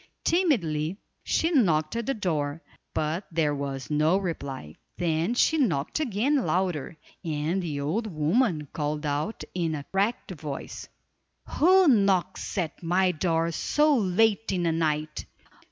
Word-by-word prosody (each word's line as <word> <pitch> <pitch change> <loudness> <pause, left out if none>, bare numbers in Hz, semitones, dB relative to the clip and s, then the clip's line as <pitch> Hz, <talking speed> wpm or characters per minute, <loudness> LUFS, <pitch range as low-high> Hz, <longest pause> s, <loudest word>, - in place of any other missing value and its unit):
Timidly 190 - +1 0.3
she 330 - +1
knocked 170 - +2
at 235 -1 -3
the 275 - 0
door, 155 -6 -2 0.3
but 160 +5 -1
there 155 -3 +1
was 140 0 -4
no 155 +5 +3
reply. 140 - -5 0.2
Then 170 +5 0
she 320 +5 +3
knocked 170 - 0
again 270 +1 +1
louder, 180 - -1 0.3
and 160 +3 -1
the 155 -5 -3
old 195 +11 -1
woman 160 - +1
called 150 0 -2
out 150 +9 -2
in 165 -3 -1
a 145 -1 -6
cracked 200 +2 0
voice: 150 -5 -7 0.6
"Who 370 +2 +5
knocks 195 - +2
at 165 -5 -2
my 180 +2 +2
door 165 0 0
so 295 - +2
late 220 +1 +2
in 180 -2 0
the 165 - +2
night!" 155 -1 -1
170 Hz, 135 wpm, -27 LUFS, 155-215 Hz, 0.6 s, Who